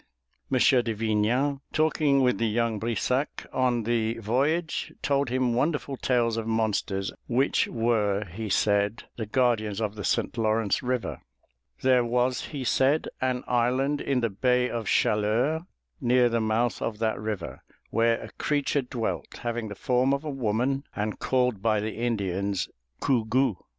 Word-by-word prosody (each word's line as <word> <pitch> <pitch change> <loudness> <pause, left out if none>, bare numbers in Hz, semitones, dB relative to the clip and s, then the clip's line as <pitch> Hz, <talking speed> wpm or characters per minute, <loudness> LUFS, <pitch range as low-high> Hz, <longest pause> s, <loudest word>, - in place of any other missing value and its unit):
M. 130 - +3
de 125 -3 +3
Vignan, 115 +6 +1
talking 155 -3 +2
with 125 -6 +2
the 115 - +2
young 115 0 0
Brissac 120 +5 -1
on 125 -3 +1
the 115 0 0
voyage, 140 +9 0
told 140 -2 +1
him 125 -1 +1
wonderful 140 +2 0
tales 120 -3 +1
of 115 -1 -3
monsters 105 -3 -1
which 130 +3 +2
were, 105 -3 +1
he 105 +5 -6
said, 100 +2 +1
the 110 -3 -4
guardians 110 -4 +1
of 105 -2 -1
the 105 -1 -7
St. - - 0
Lawrence 110 -2 +1
River. 125 -1 -2 0.6
There 130 -1 +4
was, 125 +2 0
he 140 -4 -5
said, 135 +5 +2
an 130 -1 0
island 130 +4 +1
in 135 -3 0
the 115 -2 0
bay 125 +4 +1
of 115 -3 -3
Chaleurs, 115 +13 +2 0.4
near 125 -1 +4
the 115 0 0
mouth 110 +2 0
of 110 -2 -2
that 110 0 -1
river, 105 -5 -5 0.3
where 115 +1 +2
a - - -9
creature 145 -1 0
dwelt, 125 -3 -4
having 120 -1 -2
the 100 - -7
form 130 +2 +2
of 140 - -6
a 155 - -3
woman 130 +2 0
and 105 0 -3
called 125 -6 +1
by 110 -1 +2
the 110 +1 -3
Indians 100 -4 -1 0.4
Gougou. 125 -2 +2
120 Hz, 155 wpm, -27 LUFS, 110-130 Hz, 0.6 s, There